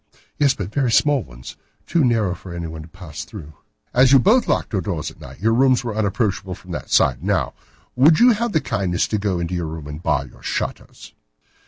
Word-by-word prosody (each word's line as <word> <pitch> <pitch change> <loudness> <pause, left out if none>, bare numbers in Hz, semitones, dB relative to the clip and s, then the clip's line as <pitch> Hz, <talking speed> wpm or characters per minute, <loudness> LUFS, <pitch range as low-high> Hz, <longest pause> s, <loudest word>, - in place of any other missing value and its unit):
"Yes, 140 -2 +3
but 100 0 -6
very 130 -2 +1
small 145 +2 +3
ones. - - -11 0.3
Too 165 - +1
narrow 115 -7 +2
for 90 0 -9
anyone 80 -2 -6
to 75 - -11
pass 85 -3 -9
through." 80 -8 -10 0.4
"As 130 +1 +5
you 140 - +8
both 220 - +4
locked - - -1
your 95 - +1
doors 85 -4 -3
at - - -19
night, 65 +1 -11
your 110 +3 +2
rooms 130 +1 +3
were 115 -3 -4
unapproachable 100 -3 -1
from 95 -2 -13
that 75 -7 -6
side. - - +2
Now, - - 0 0.4
would 150 +5 +5
you 245 +1 +7
have 230 +1 0
the 155 - +1
kindness 95 -7 -1
to 105 - 0
go 100 -3 -1
into 85 +1 -3
your 85 -2 -2
room 80 -1 -7
and 75 +2 -7
bar - - 0
your - - -17
shutters?" - - -5
100 Hz, 215 wpm, -21 LUFS, 85-130 Hz, 0.4 s, you